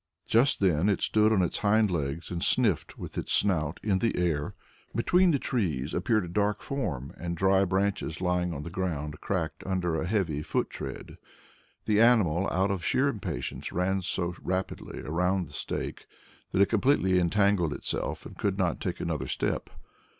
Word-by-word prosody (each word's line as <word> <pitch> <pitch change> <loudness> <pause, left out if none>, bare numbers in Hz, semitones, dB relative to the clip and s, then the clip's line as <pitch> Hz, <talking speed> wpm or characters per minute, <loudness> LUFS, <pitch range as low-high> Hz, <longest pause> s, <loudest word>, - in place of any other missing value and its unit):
Just 120 +2 +3
then 90 0 +3
it 100 - +1
stood 110 0 +3
on 100 -4 +3
its 90 - -1
hindlegs 90 -9 +1
and 85 -1 -2
sniffed 110 - +1
with - - -5
its - - -5
snout 85 -6 +1
in 100 -3 +1
the 115 - 0
air. 80 -5 0 0.4
Between 180 +10 +4
the 150 - +3
trees 80 - -1
appeared 110 -6 +1
a - - -7
dark 105 +3 0
form, 75 - -3
and 85 0 -4
dry 95 +2 +4
branches 95 -3 -1
lying 90 -1 0
on 75 -3 -5
the 85 - -7
ground 75 -5 -3
cracked 85 -5 -2
under 90 -4 -1
a 80 - -2
heavy 90 -8 0
foot - - -1
tread. - - -7 0.7
The 105 0 +3
animal, 100 -7 +4
out 95 +2 +1
of 95 -3 -3
sheer 135 +2 +2
impatience, 100 - -4
ran 95 +2 0
so 90 -1 -2
rapidly 95 +1 -3
round 90 +2 0
the - - -15
stake - - -5 0.4
that 100 - +4
it - - 0
completely 105 -5 +3
entangled 95 -2 +2
itself - - -3
and - - -9
could 100 -1 -1
not 90 -4 0
take - - -3
another - - -2
step. - - -2
95 Hz, 170 wpm, -28 LUFS, 85-105 Hz, 0.7 s, Between